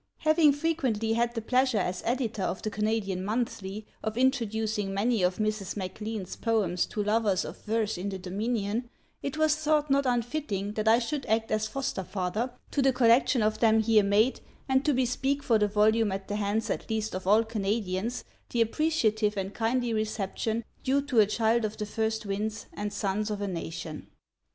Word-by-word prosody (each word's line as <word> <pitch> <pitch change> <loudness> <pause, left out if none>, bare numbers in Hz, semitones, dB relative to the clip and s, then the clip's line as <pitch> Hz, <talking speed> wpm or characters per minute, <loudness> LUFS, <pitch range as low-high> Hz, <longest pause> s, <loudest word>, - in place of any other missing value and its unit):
Having 310 -2 +5
frequently 270 -8 0
had 235 +1 0
the 225 - -3
pleasure 255 0 +2
as 180 -2 -1
editor 235 -4 -1
of 185 - -2
The 215 - -2
Canadian 205 -3 -1
Monthly, 210 -2 -3 0.2
of 220 0 -3
introducing 220 -5 0
many 220 +2 +1
of 180 0 +2
Mrs. 215 -2 -2
MacLean's 205 +1 -5
poems 205 -6 0
to 210 - -2
lovers 210 -3 +1
of - - -9
verse 215 -3 0
in 195 +3 -2
the 195 - -4
Dominion 210 +4 -2 0.3
it 280 +2 -4
was 310 -1 +3
thought 300 -1 +1
not 275 -1 +3
unfitting 235 -5 -1
that 215 0 -2
I 225 +1 +7
should 265 +3 -3
act 220 0 +1
as 215 0 +1
foster 270 -7 -3
father 200 +7 -2 0.2
to 285 - +1
the 270 0 +4
collection 245 0 +4
of 215 0 +1
them 225 -1 +4
here 220 -1 +4
made 205 +5 +2 0.3
and 265 0 +2
to 300 - +3
bespeak 265 +3 0
for 225 -3 +3
the 210 - +3
volume 215 +1 +3
at 195 0 -4
the 205 - -2
hands 210 +2 -1
at - - -4
least 220 -1 -1
of 185 0 -5
all 215 +3 +5
Canadians 215 0 -2 0.3
the 235 - 0
appreciative 225 -5 +1
and 195 +1 -3
kindly 235 +1 0
reception 215 +1 -2 0.2
due 275 +2 +2
to 270 -5 +1
a 210 - +6
Child 225 +2 +2
of 215 0 -3
the 210 - -3
first 220 +1 -2
winds 210 +2 -3
and 205 0 -4
suns 205 +1 -1
of 210 -1 -3
a 205 - -2
nation. 165 -3 -5
220 Hz, 185 wpm, -28 LUFS, 205-240 Hz, 0.3 s, I